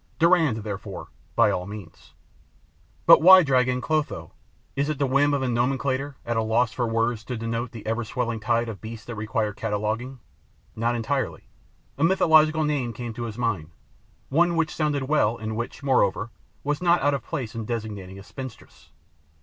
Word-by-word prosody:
'Durand,' 160 - +3
therefore, 100 -2 -6 0.3
by - - +5
all 90 +1 -3
means. 100 -5 -11 0.9
But - - +8
why 185 +2 +9
drag 130 -3 +3
in 125 0 0
'Clotho'? 145 - -2 0.4
Is 140 +2 0
it 155 - -1
the 140 - +1
whim 140 +2 +3
of 140 -2 0
a - - +1
nomenclator, 130 +3 0
at 120 - -1
a 110 - +2
loss 110 +1 +1
for 120 -2 -1
words 115 0 0
to 125 - -4
denote 115 +2 -3
the 115 - -10
ever 115 +2 -1
swelling 115 0 -2
tide 115 +2 +1
of 105 -6 -7
beasts 115 +1 -8
that 120 - -6
require 110 -1 -2
cataloguing? 110 +5 -3 0.6
Not 115 +2 0
entirely. 120 +2 -2 0.5
A - - +1
mythological 155 -3 +4
name 140 -6 -1
came 120 +1 -6
to 120 +1 -5
his 110 -1 -6
mind, 100 -10 -1 0.6
one 170 +4 +3
which 165 -2 0
sounded 150 -3 0
well 130 -5 +2
and 110 0 -4
which, 120 +4 -5
moreover, 115 -5 +1 0.3
was 145 +2 -1
not 175 -1 +4
out 145 0 +3
of 135 -5 -2
place 120 -4 -4
in 115 -2 -5
designating 105 -5 -5
a 100 - -10
spinstress. 130 +2 -10
120 Hz, 180 wpm, -25 LUFS, 110-140 Hz, 0.9 s, why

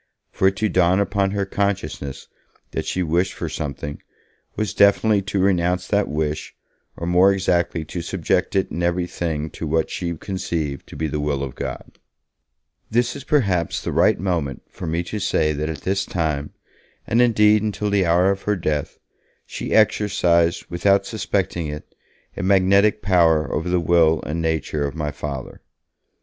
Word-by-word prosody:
For 95 - +2
it 95 - +2
to 110 +2 0
dawn 90 -1 +3
upon 100 -1 +1
her 100 0 -1
consciousness 95 -9 -3 0.4
that - - -3
she 90 - -1
wished 90 +3 0
for 85 - -5
something, 75 -2 -5 0.5
was 110 -2 -2
definitely 100 +1 +4
to 100 +1 -4
renounce 90 -1 +1
that 100 0 +2
wish, 75 0 -3 0.4
or, 85 - -4
more 90 +3 +5
exactly, 85 -4 0
to 85 +3 -5
subject - - -1
it 95 - +1
in 85 - -3
every 85 +1 +1
thing 80 -3 -3
to 80 - -5
what 80 +1 0
she 85 -2 -3
conceived 85 -7 -4
to - - -11
be 80 - -2
the 75 0 -3
will 75 -2 -1
of 65 -3 -5
God. - - -7 0.9
This 120 +2 +1
is 140 - -7
perhaps 100 - +1
the - - -4
right - - +3
moment 85 -8 -2
for 90 - -7
me 85 +2 -1
to 105 +5 -5
say 80 -5 +1
that 75 +2 -3
at 75 -3 -5
this 95 +1 0
time, 75 -6 -2 0.5
and 115 +3 +2
indeed 105 -3 +4
until 105 -1 -2
the 100 -3 +2
hour 90 +3 +4
of 100 0 -3
her 105 - 0
death, 75 -5 -2 0.5
she - - -6
exercised, 90 -6 +3
without 100 +3 +2
suspecting 95 -6 -2
it, 75 +1 -8 0.4
a - - -4
magnetic 100 +2 +3
power 85 -5 +3
over 80 +3 -2
the 90 0 +2
will 80 -1 +3
and 80 +2 -3
nature 80 -2 -1
of 70 -1 -3
my 75 -2 -2
Father. 70 -2 -6
90 Hz, 170 wpm, -22 LUFS, 80-100 Hz, 0.9 s, more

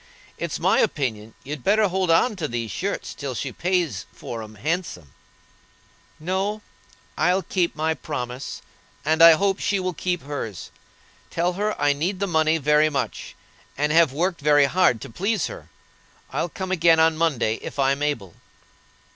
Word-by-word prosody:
It's - - -3
my - - +3
opinion 110 -6 -1
you'd 145 -2 -6
better 210 +1 +4
hold 185 -1 -1
on 190 +8 +3
to 160 -4 -2
these 115 -3 -4
shirts 200 +2 -3
till 140 -3 -5
she 130 +2 -3
pays 170 - -1
for 115 -1 -7
'em 110 0 -10
handsome." 145 - -3 1.1
"No; 190 +6 -2 0.6
I'll 180 +4 +2
keep 175 0 -1
my 160 +1 0
promise, 125 -5 -6 0.4
and 160 +2 +2
I 165 0 +10
hope 195 +4 +1
she 200 -3 0
will 185 -1 -2
keep 175 +1 -2
hers. 140 -9 -6 0.6
Tell 175 +2 0
her 210 +3 -2
I 145 0 +3
need 175 +7 -2
the 200 - 0
money 160 -3 +2
very 150 +1 +3
much, 140 -3 -4 0.4
and 150 +2 +1
have 165 -3 +5
worked 170 +4 -1
very 145 -1 +5
hard 140 -7 +2
to - - -8
please 195 - 0
her. - - -8 0.6
I'll 175 - -1
come 185 +2 -5
again 165 -2 +4
on 160 0 +4
Monday, 135 -9 0
if - - -8
I'm 140 +1 +1
able." 115 - -2
160 Hz, 165 wpm, -23 LUFS, 140-185 Hz, 1.1 s, I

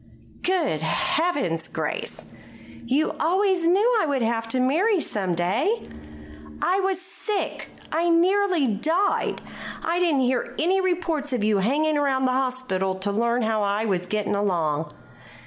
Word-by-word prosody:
"Good 330 - 0
Heavens, 290 - 0
Grace! - - -4 0.6
You 275 +6 +1
always 370 +1 +2
knew 425 +7 +3
I - - 0
would 275 -4 0
have 225 0 -1
to 255 +3 0
marry 345 - +2
some 190 - -1
day." 210 - 0 0.7
"I 380 - +1
was 380 -1 0
sick; 395 +2 -4 0.2
I 335 +2 +1
nearly 360 -1 +3
died. 315 - 0 0.4
I 335 +2 0
didn't 325 -7 +2
hear 255 -1 -1
any 370 +5 +2
reports 335 -6 -1
of 240 -4 -1
you 210 -1 +2
hanging 295 +8 +1
around 265 -2 +1
the 255 - +2
hospital 255 -8 -1
to 190 +2 -1
learn 235 +3 +1
how 220 -1 0
I 205 +2 0
was 180 -4 -1
getting 210 +1 -1
along." 165 -7 0
270 Hz, 145 wpm, -24 LUFS, 210-350 Hz, 0.7 s, knew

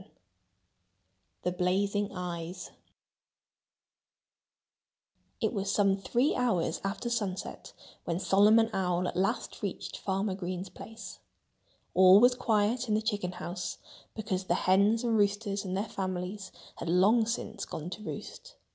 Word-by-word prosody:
VII - - -19 1.3
The 180 - 0
Blazing 200 +3 0
Eyes 175 -1 -5 2.7
It - - 0
was 195 -2 -1
some 200 -2 +3
three 240 +8 +1
hours 185 -10 0
after 195 +5 -3
sunset 205 -6 -3 0.3
when 170 0 -1
Solomon 210 +4 +5
Owl 180 -1 0
at - - -4
last 195 +6 -1
reached 200 -3 -5
Farmer 195 +1 -1
Green's 185 0 -4
place. 225 +5 -10 0.7
All 185 +1 +8
was 245 +2 +6
quiet 235 0 +1
in 210 - +2
the 215 - +1
chicken 205 -5 -2
house 175 0 -5 0.4
because 195 -4 -3
the 175 - +1
hens 200 +6 +3
and 230 -2 +1
roosters 205 -1 +1
and 190 -1 -3
their 200 - 0
families 190 -1 -4 0.3
had 165 - -5
long 210 +6 +4
since 225 -1 -3
gone 160 +3 -6
to 210 - -7
roost. - - -8
195 Hz, 130 wpm, -30 LUFS, 185-220 Hz, 2.7 s, All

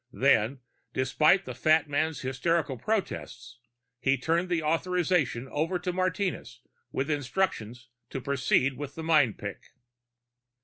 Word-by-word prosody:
Then, 130 -1 +2 0.3
despite 155 +8 +3
the - - -5
fat 155 0 +3
man's 155 +2 -1
hysterical 140 +2 0
protests, 125 - -3 0.4
he 135 +2 +2
turned 165 +7 0
the 170 -3 0
authorization 165 -5 +1
over 165 +6 -1
to 180 +1 -3
Martinez 185 -8 -2 0.3
with 140 +3 -1
instructions 125 - -2 0.2
to 135 - -4
proceed 135 0 +1
with 145 0 -6
the 160 - -6
mind 150 -9 +3
pick. - - -6
150 Hz, 125 wpm, -28 LUFS, 130-170 Hz, 0.4 s, despite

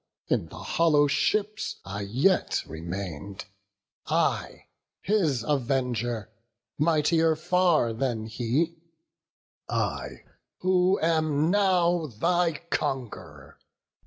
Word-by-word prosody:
in - - +1
the - - -12
hollow 150 -3 +3
ships 210 +8 0
I 100 +1 -5
yet 130 - +1
remain'd, 90 +3 -6 0.6
I, - - 0 0.4
his 165 - +1
avenger, 120 -5 -1 0.5
mightier 160 +1 +3
far 170 -6 +2
than 115 -2 -2
he; 130 +9 -1 0.9
I, - - -3 0.4
who 185 +1 +3
am 155 -1 +2
now 180 -4 +2
thy 170 +7 0
conqu'ror. 85 - -4
150 Hz, 85 wpm, -27 LUFS, 115-175 Hz, 0.9 s, hollow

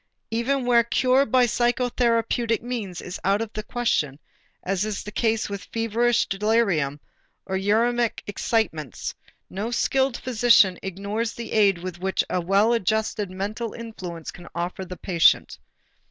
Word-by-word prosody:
Even 250 +3 0
where 240 -1 +5
cure 255 +3 +2
by 250 +2 +4
psychotherapeutic 240 -1 +1
means 220 -8 -4
is 180 +1 -7
out 200 +2 +2
of 225 -1 -4
the 215 - -3
question, 210 - -1 0.5
as 195 +1 0
is 215 -2 -3
the 210 - -7
case 225 0 0
with 200 -1 -6
feverish 230 +1 +1
delirium 195 -9 +1 0.5
or 190 - -3
uræmic 230 +4 +1
excitements, 195 - -2 0.3
no 205 +4 -4
skilled 265 +1 +1
physician 230 -6 +4
ignores 200 +4 -3
the 235 - -7
aid 200 -4 +4
which 185 +2 -2
a 180 - +1
well 200 +6 +3
adjusted 220 -1 0
mental 205 +5 -4
influence 185 -8 -7
can 175 - -13
offer 175 +2 -3
to 190 - -6
the 180 - -7
patient. 170 -4 +3
215 Hz, 140 wpm, -24 LUFS, 190-235 Hz, 0.5 s, where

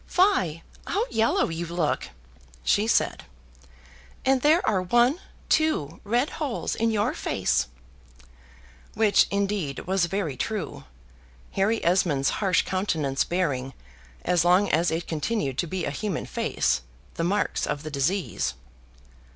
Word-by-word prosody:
"Fie! 185 - +2 0.2
how 415 +5 0
yellow 225 -3 +2
you 165 +1 -4
look," 165 - -1 0.5
she 210 +2 +2
said; - - +1 1.0
"and 265 -1 +3
there 310 +5 +4
are 195 -4 +2
one, 240 - +3 0.3
two, 170 - +1
red 240 +7 +1
holes 275 -6 -2
in 230 0 +1
your 210 -2 +1
face;" - - 0 1.3
which, 210 -2 +4
indeed, 200 -7 -2
was 185 -2 +1
very 175 -6 -2
true; 210 - -4 0.7
Harry 210 +3 0
Esmond's 165 -6 +2
harsh 190 -4 +3
countenance 160 -8 0
bearing, 140 -7 -1 0.5
as 175 -2 +3
long 180 +3 +4
as 165 +3 +2
it 165 +1 -2
continued 160 - -2
to 175 - 0
be 180 +1 -3
a - - -2
human 200 +7 -3
face, 60 0 0 0.3
the 165 - -3
marks 200 +4 0
of 145 0 -3
the 155 - -6
disease. 140 - -1
185 Hz, 130 wpm, -26 LUFS, 160-215 Hz, 1.3 s, there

